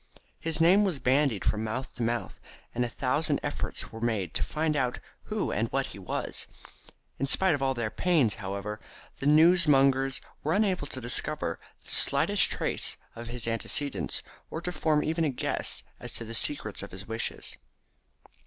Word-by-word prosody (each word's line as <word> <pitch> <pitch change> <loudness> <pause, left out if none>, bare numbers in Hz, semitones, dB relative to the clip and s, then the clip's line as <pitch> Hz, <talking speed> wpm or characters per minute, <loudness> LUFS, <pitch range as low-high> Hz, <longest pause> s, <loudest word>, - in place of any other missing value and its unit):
His 160 -1 -2
name 180 +5 +6
was 185 -7 0
bandied 130 -4 +1
from 110 0 0
mouth 120 +4 -4
to - - -7
mouth, 115 +1 -2 0.3
and 125 - 0
a 120 - -2
thousand 135 +6 0
efforts - - -3
were 115 - -9
made 110 -7 -1
to - - -2
find 155 0 -1
out 125 -3 0 0.3
who 215 -2 -2
and 110 +3 0
what 135 0 0
he - - -10
was. 95 - -3 0.7
In 140 - 0
spite 190 +4 +3
of 145 - -2
all 135 -1 +1
their 115 -3 -2
pains, 155 - +2
however, 100 +2 -4 0.4
the 140 - -2
newsmongers 145 -5 +5 0.2
were 155 - +1
unable 195 -7 +1
to 130 - -5
discover 120 0 -2 0.2
the - - -5
slightest - - +5
trace - - -1 0.2
of 115 0 -8
his 120 -1 -3
antecedents, 130 +4 0 0.3
or - - -4
to 180 - -3
form 155 -3 +1
even 165 +1 0
a 155 - +2
guess 130 - -2 0.2
as - - -4
to 115 - +1
the 115 - -7
secret 110 -3 +4
of 100 - -7
his 95 +2 -8
riches. 115 +1 -3
135 Hz, 175 wpm, -28 LUFS, 115-155 Hz, 0.7 s, name